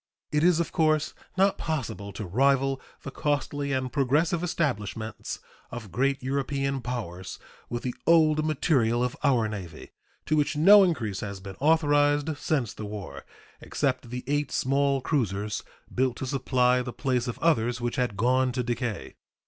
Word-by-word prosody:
It 150 +1 +1
is, 175 -1 +4
of 170 - -1
course, 155 -2 +2 0.2
not 195 +1 +3
possible 115 - -3
to 105 - -5
rival 135 +6 +2 0.2
the 140 - -6
costly 145 -1 -1
and 130 -1 -2
progressive 150 +5 +2
establishments 110 - -3 0.3
of 110 -5 -8
great 135 +1 0
European 135 0 -1
powers 100 -8 -5 0.3
with 120 0 -4
the 125 - -2
old 155 -2 +5
material 130 -6 +1
of 125 +1 -2
our 125 -6 +3
Navy, 95 -7 -8 0.3
to 155 - +1
which 150 0 +1
no 200 +7 +8
increase 115 - -1
has 100 -2 -5
been 95 0 -8
authorized 145 0 +3
since 135 -9 -1
the 110 - -7
war, 105 -2 -7 0.4
except 130 -4 -2
the 125 +1 -5
eight 145 +1 -1
small 140 0 +1
cruisers 105 - -1 0.3
built 130 -1 +1
to - - -4
supply 125 -1 +2
the 125 0 -5
place 125 -3 -1
of 120 - -4
others 125 -7 +1
which 120 -1 -3
had 125 -5 -1
gone 130 +2 +2
to 125 0 -1
decay. 120 -2 -3
130 Hz, 155 wpm, -27 LUFS, 120-145 Hz, 0.4 s, no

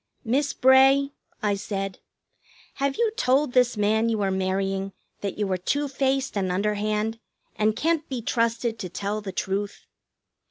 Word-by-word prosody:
"Miss 275 +5 +1
Bray," 270 +2 +5 0.3
I 205 -1 +2
said, 195 -1 -4 0.8
"have 275 0 +1
you 465 -2 +2
told 260 - +2
this 250 -3 +3
man 220 +2 +2
you 220 -2 0
are 195 - +1
marrying 195 +1 -1 0.3
that 200 -2 -4
you 210 -1 0
are 185 - +1
two 285 +11 -1
faced 270 -1 0
and 190 -2 0
underhand, 210 +3 -1 0.4
and 215 0 +1
can't 325 -1 0
be 260 -3 -3
trusted 230 -1 0
to 185 - -5
tell 205 +4 -3
the 200 -2 -5
truth? 195 +2 -3
215 Hz, 155 wpm, -25 LUFS, 195-265 Hz, 0.8 s, Bray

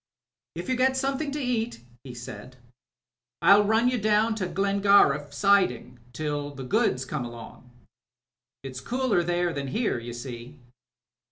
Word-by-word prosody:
*'If 170 +2 -6
you 255 - +1
get 260 +1 +2
something 275 +2 -1
to 290 +2 -4
eat," 240 - -2 0.2
he 125 -3 -9
said, 120 0 -9 0.9
"1*11 205 +1 +6
run 220 +3 +3
you 250 -1 +1
down 215 +2 +2
to 200 -4 -3
Glengariff 195 -7 +3
siding 145 -8 +1
till 145 +2 -3
the 135 - -7
goods 125 0 +1
comes 130 -2 -4
along. 120 +1 -12 0.9
It's 130 -1 -7
cooler 250 -7 0
there 175 0 0
than 140 -2 -4
here, 210 - -1
you 120 0 -7
see." 120 +3 -8
175 Hz, 145 wpm, -26 LUFS, -, 0.9 s, 1*11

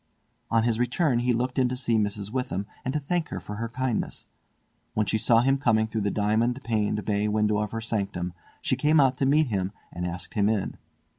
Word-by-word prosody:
On 115 -1 +3
his 115 -1 +1
return 125 +2 +2
he 125 +1 +2
looked 125 +2 0
in 125 -1 +3
to 125 - -3
see 120 -3 +1
Mrs. 105 -1 -2
Witham 115 -6 -2 0.2
and 130 - -1
to - - +2
thank 165 +3 -1
her - - -4
for 105 - -7
her 115 +1 -3
kindness. 130 -1 -2 0.7
When 110 - +2
she 110 - +1
saw 115 +1 +5
him 135 +2 +2
coming 110 -5 +3
through 110 0 -3
the 100 - +1
diamond 110 +5 +1
paned 105 -2 0
bay 105 0 +1
window 105 0 +2
of 105 -1 -1
her 115 +1 -4
sanctum 100 -5 -2 0.3
she - - +2
came 150 +4 +3
out 135 -2 +4
to 135 - +1
meet 150 0 +4
him 95 -3 -1 0.2
and 90 +1 -3
asked 90 +1 -6
him 105 -2 +2
in. 105 -4 -1
115 Hz, 220 wpm, -26 LUFS, 105-125 Hz, 0.7 s, saw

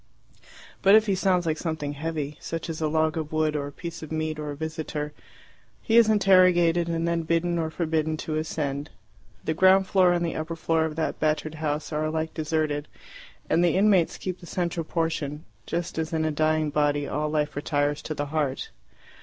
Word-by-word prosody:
But 195 +1 +7
if 220 0 +6
he 200 - +1
sounds 185 -2 +2
like 160 -1 -1
something 155 -3 -3
heavy, 150 -1 -4
such 165 0 -4
as 160 - -6
a 155 - +2
log 155 +1 +1
of 155 -2 -4
wood, 155 -1 +1
or 145 -1 -2
a - - -8
piece 170 +3 -7
of 155 - -9
meat, 155 -1 -2
or 150 -1 -4
a 145 - -4
visitor, 155 -1 -4 0.7
he 225 - +1
is 230 -2 +7
interrogated, 180 -4 +4
and 165 0 -1
then 170 0 +1
bidden 170 +1 0
or 160 -1 -1
forbidden 160 -1 -1
to 155 - -3
ascend. 150 -2 -2 0.6
The 160 - +1
ground 190 +3 +5
floor 185 -2 +4
and 175 -1 +1
the 165 - -3
upper 160 +1 -4
floor 160 0 +1
of 155 -1 -4
that 160 - -2
battered 155 0 0
house 150 0 -2
are 155 +1 0
alike 160 +1 -2
deserted, 155 -2 -1 0.6
and 170 - +3
the 170 -3 +3
inmates 195 -4 +3
keep 185 -1 -5
the 175 - -12
central 170 -2 -2
portion, 160 -3 -2 0.2
just 170 -1 -3
as 160 0 -2
in 160 -1 +1
a 155 - +1
dying 155 0 +1
body 145 -1 +1
all 150 +2 -1
life 150 -1 -1
retires 145 0 0
to 155 - -5
the 145 - -2
heart. 145 -4 -1
160 Hz, 200 wpm, -26 LUFS, 150-170 Hz, 0.7 s, But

